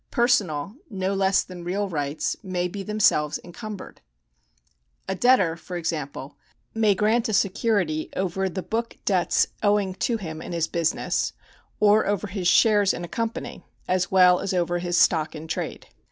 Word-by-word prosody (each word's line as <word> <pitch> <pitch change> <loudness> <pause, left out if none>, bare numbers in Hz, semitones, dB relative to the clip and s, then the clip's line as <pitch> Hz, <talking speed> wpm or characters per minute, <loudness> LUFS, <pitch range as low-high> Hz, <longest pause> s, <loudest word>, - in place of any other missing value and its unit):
Personal, 205 - +1 0.2
no 190 -2 -2
less 195 0 +2
than 180 -2 -10
real 195 +4 -1
rights 145 -4 -2
may 180 -3 -2
be 195 +3 -6
themselves 195 -8 +2
encumbered. 210 +3 -9 1.1
A - - -1
debtor, 190 -5 +3
for 175 +1 -7
example, 150 -5 -4 0.4
may 215 -3 +3
grant 220 +3 +1
a - - -1
security 195 -6 +1
over 190 +1 -1
the 185 0 -5
book 230 +1 -3
debts 185 -4 +2 0.2
owing 205 -2 +2
to 230 +5 -1
him 160 -6 -7
in - - -7
his 165 -1 0
business 170 -2 -1 0.5
or 210 0 +4
over 205 0 0
his 190 -2 -3
shares 205 +1 +4
in - - -6
a - - -5
company, 230 +5 -4 0.2
as 185 -1 +1
well 180 -1 +6
as 195 - -2
over 175 0 0
his 175 0 -1
stock 160 -2 +3
in 155 +1 -8
trade. - - -4
185 Hz, 160 wpm, -24 LUFS, 170-210 Hz, 1.1 s, well